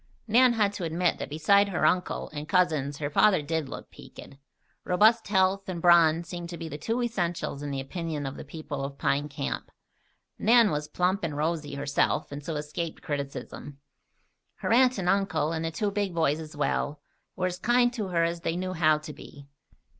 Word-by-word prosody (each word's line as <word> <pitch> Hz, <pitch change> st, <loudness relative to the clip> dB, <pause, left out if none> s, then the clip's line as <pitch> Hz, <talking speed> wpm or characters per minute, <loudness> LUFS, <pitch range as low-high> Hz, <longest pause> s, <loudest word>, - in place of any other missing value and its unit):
Nan 245 Hz, +3 st, +5 dB
had 210 Hz, -3 st, +1 dB
to 200 Hz, -, -5 dB
admit 170 Hz, +1 st, 0 dB
that -, -, -5 dB
beside 200 Hz, +7 st, +3 dB
her 190 Hz, -, 0 dB
uncle 180 Hz, 0 st, 0 dB
and 150 Hz, 0 st, -6 dB
cousins 155 Hz, -7 st, +1 dB
her 145 Hz, 0 st, -3 dB
father 185 Hz, +1 st, +4 dB
did 160 Hz, -1 st, -2 dB
look -, -, -9 dB
"peaked." -, -, -13 dB, 0.5 s
Robust 220 Hz, +5 st, +4 dB
health 195 Hz, 0 st, +1 dB
and 175 Hz, -2 st, -3 dB
brawn 170 Hz, -1 st, +5 dB
seemed 175 Hz, 0 st, -7 dB
to 170 Hz, -, -6 dB
be 165 Hz, 0 st, -6 dB
the 150 Hz, -1 st, -7 dB
two 230 Hz, +10 st, -1 dB
essentials 175 Hz, -10 st, -2 dB
in 145 Hz, -, -4 dB
the 140 Hz, -1 st, -3 dB
opinion 155 Hz, +1 st, -4 dB
of 135 Hz, -, -5 dB
the -, -, -8 dB
people 145 Hz, -1 st, -6 dB
of 140 Hz, 0 st, -6 dB
Pine 140 Hz, +2 st, 0 dB
Camp. 100 Hz, -, -4 dB, 0.7 s
Nan 230 Hz, -1 st, +5 dB
was 150 Hz, 0 st, -2 dB
plump 180 Hz, +5 st, 0 dB
and 150 Hz, -4 st, -3 dB
rosy 150 Hz, -2 st, -2 dB
herself 140 Hz, 0 st, 0 dB
and 145 Hz, 0 st, -7 dB
so 160 Hz, +2 st, -4 dB
escaped 150 Hz, +2 st, -5 dB
criticism. 140 Hz, 0 st, -5 dB, 0.8 s
Her -, -, -1 dB
uncle 255 Hz, 0 st, +4 dB
and 180 Hz, -, -2 dB
aunt, 195 Hz, -2 st, +1 dB, 0.2 s
and 160 Hz, -, -3 dB
the -, -, 0 dB
two 200 Hz, +6 st, -2 dB
big 200 Hz, -3 st, -2 dB
boys 160 Hz, -2 st, +1 dB
as 155 Hz, -1 st, -9 dB
well, 145 Hz, 0 st, -1 dB, 0.4 s
were 185 Hz, -, -1 dB
as 180 Hz, 0 st, -3 dB
kind 240 Hz, +3 st, +3 dB
to 215 Hz, -5 st, -3 dB
her 170 Hz, -2 st, +1 dB
as 170 Hz, 0 st, -1 dB
they 165 Hz, 0 st, -1 dB
knew 185 Hz, 0 st, -3 dB
how 155 Hz, -3 st, +3 dB
to 150 Hz, 0 st, -9 dB
be. 145 Hz, 0 st, -13 dB
165 Hz, 200 wpm, -27 LUFS, 150-190 Hz, 0.8 s, Nan